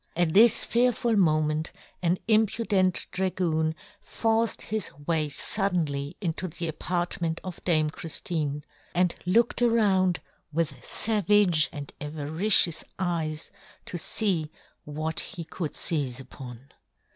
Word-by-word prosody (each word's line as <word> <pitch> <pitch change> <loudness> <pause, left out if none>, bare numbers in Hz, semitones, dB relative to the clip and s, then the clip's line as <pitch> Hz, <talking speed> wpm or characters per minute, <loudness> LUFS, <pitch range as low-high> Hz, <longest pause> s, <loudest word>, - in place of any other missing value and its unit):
At 170 -2 +1
this 225 +2 +6
fearful 235 -1 +2
moment 155 -4 +1 0.3
an 175 0 +1
impudent 215 -4 +2
dragoon 170 -4 0 0.3
forced 225 0 0
his 215 0 -3 0.2
way 155 -2 +1
fuddenly 160 -3 -1
into 180 -1 -2
the 170 0 -4
apartment 175 0 -2
of 185 -2 -8
Dame 155 -3 +3
Chriftine, 150 -3 -3 0.3
and 180 -1 +3
looked 230 +5 +2
around 200 -6 +3 0.3
with 165 +1 0
favage 205 -6 +2
and 145 -3 -7
avari 155 +7 -3
cious 170 -4 +6
eyes 165 -4 -2 0.3
to 195 -7 -4
fee 170 -4 +1 0.4
what 155 +2 -3
he 175 -4 -3
could 160 -1 -5
feize 135 -6 +1
upon. 130 -1 -11
170 Hz, 115 wpm, -27 LUFS, 155-200 Hz, 0.4 s, this